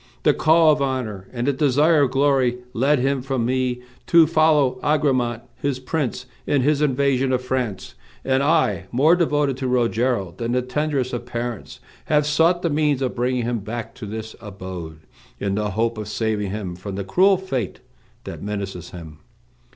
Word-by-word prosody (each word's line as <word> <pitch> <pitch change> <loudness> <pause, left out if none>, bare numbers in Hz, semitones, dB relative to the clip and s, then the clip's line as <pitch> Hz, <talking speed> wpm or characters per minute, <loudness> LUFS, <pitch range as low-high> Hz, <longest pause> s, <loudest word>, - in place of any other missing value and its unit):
The - - +5
call 160 0 +5
of 150 -1 +1
honor 120 -8 -3
and 120 -1 -3
the 140 - +2
desire 150 +3 +3
of 140 - +3
glory 135 -2 +2 0.2
led 140 +5 +2
him 135 +1 0
from 130 -2 -2
me 125 0 -1 0.2
to 170 -1 +6
follow 155 -5 +3
Agramant, 130 -6 +1
his 140 -2 -2
prince, 130 -1 -3 0.2
in 140 -3 +2
his 150 +1 +2
invasion 135 -2 +1
of 130 -1 0
France, 120 -7 -3 0.3
and 130 0 +2
I, 140 - +1
more 150 +8 +4
devoted 145 -6 +1
to 130 -1 -3
Rogero 120 -5 0
than 120 0 -2
the 125 0 +1
tenderest 135 0 -1
of 120 0 -4
parents, 120 -2 -5 0.2
have 150 -1 +2
sought 165 +4 +2
the 170 - +1
means 145 -2 +1
of 130 - -1
bringing 125 0 -1
him 120 0 -1
back 115 +2 -6
to 120 -4 -8
this 110 +1 -6
abode, 95 -6 -8 0.4
in 100 -1 -1
the 105 +1 -1
hope 115 +3 -1
of 105 - -5
saving 105 -2 -1
him 95 -3 -5
from 95 +2 -7
the 100 - -3
cruel 190 - +4
fate 135 - -4 0.4
that - - -8
menaces 100 -4 -5
him. 80 -4 -11
125 Hz, 175 wpm, -22 LUFS, 110-145 Hz, 0.4 s, to